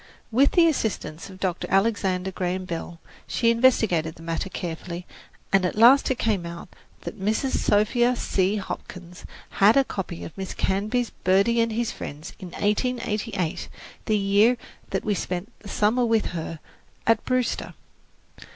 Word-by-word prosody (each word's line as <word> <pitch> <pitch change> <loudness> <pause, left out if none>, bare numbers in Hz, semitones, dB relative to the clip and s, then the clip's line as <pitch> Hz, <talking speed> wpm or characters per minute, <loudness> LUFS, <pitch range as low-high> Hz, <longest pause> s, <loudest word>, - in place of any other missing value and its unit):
With 265 +5 +4
the 340 -2 +6
assistance 210 - -2
of 190 -1 -12
Dr. 185 -2 -2
Alexander 190 -2 +1
Graham 185 0 -2
Bell, 170 -1 -6 0.3
she 230 -1 +2
investigated 220 -10 +2
the 165 - -13
matter 165 +3 -3
carefully, 175 0 -5 0.5
and 195 -1 +5
at 180 - -1
last 245 +5 +7
it 260 - 0
came 210 -6 0
out 170 +1 -8 0.3
that 215 - -8
Mrs. 220 +7 0
Sophia 240 +4 +3
C. 195 -3 0
Hopkins 180 -3 -7 0.3
had 210 +6 +6
a 275 - +6
copy 185 -8 -5
of 165 - -9
Miss 190 -1 -6
Canby's 215 +5 0
"Birdie 200 +6 +3
and 230 0 +1
His 235 0 -1
Friends" 150 +2 -8
in 185 - -7
1888, 210 -2 -1 0.4
the 215 -2 +2
year 205 +5 +4 0.3
that - - -2
we 210 - +1
spent 180 0 -4
the 205 - -11
summer 220 +5 +2
with 225 -2 +1
her 165 -1 -4 0.5
at 225 -1 +3
Brewster. 255 -2 -1
200 Hz, 150 wpm, -25 LUFS, 180-230 Hz, 0.5 s, last